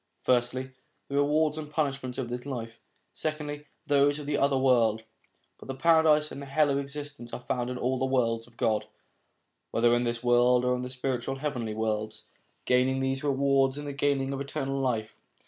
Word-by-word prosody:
Firstly, 130 +1 +1 0.4
the 140 - -1
rewards 150 +2 +2
and 150 -1 -7
punishments 135 -4 -2
of 130 - -2
this 125 +1 -5
life; 115 -5 -6 0.3
secondly, 150 -1 -4 0.2
those 145 0 +3
of 150 - -7
the 145 0 -1
other 140 -1 +2
world. 115 -4 +3 0.6
But - - -12
the 135 - -4
paradise 155 0 +4
and 140 - -7
hell 145 +1 +2
of 140 - +1
existence 140 -3 -7
are - - -3
found 125 -1 -2
in 125 - -4
all 130 +1 0
the 130 - +1
worlds 115 -3 0
of 120 -1 -22
God, 110 -2 +1 0.8
whether 120 +1 +3
in 120 - +1
this 120 0 -2
world 125 0 +4
or 125 - +3
in 125 - -3
the 125 - -5
spiritual 130 0 -2
heavenly 125 -6 -3
worlds. 110 0 -2 0.4
Gaining 125 +1 +3
these 135 +1 -1
rewards 140 -1 +2
is 145 - -5
the 145 -1 -5
gaining 140 -1 0
of 135 - -3
eternal 135 0 -3
life. 110 -5 -1
135 Hz, 185 wpm, -28 LUFS, 120-140 Hz, 0.8 s, paradise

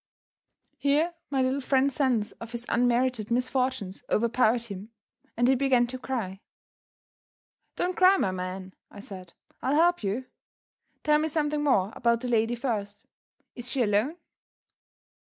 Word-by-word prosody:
Here 300 +5 +2 0.2
my 270 -2 +1
little 260 +2 0
friend's 270 +1 +2
sense 250 -6 +1
of 230 0 -8
his 235 0 -4
unmerited 245 -2 +1
misfortunes 250 -4 -1
overpowered 235 +1 +2
him, 205 -2 -8 0.5
and 240 +1 +3
he 265 - +5
began 260 -2 +3
to 255 +2 -6
cry. 215 -8 -4 1.3
"Don't 360 0 -1
cry, 370 +2 +6
my 195 - +1
man!" 185 +1 -5 0.2
I 205 - -12
said; 185 -4 -10 0.3
"I'll 270 +3 +1
help 345 +3 +3
you. 210 +6 -2 0.8
Tell 300 0 +4
me 310 - 0
something 300 -1 0
more 210 -8 +2
about 235 -1 +1
the 250 - -3
lady 230 0 +2
first. 215 -5 -4 0.5
Is 240 0 -8
she 260 -2 +1
alone?" 215 +8 +1
245 Hz, 140 wpm, -27 LUFS, 215-270 Hz, 1.3 s, cry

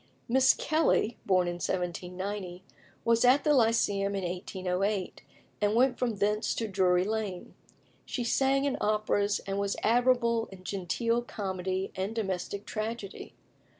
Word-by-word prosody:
Miss 260 +2 +5
Kelly, 310 -7 +1
born 185 -2 +3
in 175 0 -3
1790, 180 +1 -3 0.4
was 230 0 +3
at 255 +3 +5
the 300 - +4
Lyceum 210 -5 +2
in 195 - -2
1808, 185 +2 -2 0.4
and 205 +1 +2
went 250 +1 +3
from 240 -3 0
thence 210 +2 0
to 225 - -2
Drury 185 -3 +2
Lane. 210 -3 -3 0.5
She 245 - -3
sang 270 +3 +2
in 280 - 0
operas, 210 -1 +1
and 195 0 -2
was 200 0 -1
admirable 235 -1 +3
in 185 -1 -12
genteel 205 +6 -1
comedy 190 -4 -3
and 195 +4 -3
domestic 200 -1 -3
tragedy. 215 -2 -5
205 Hz, 135 wpm, -29 LUFS, 190-230 Hz, 0.5 s, Miss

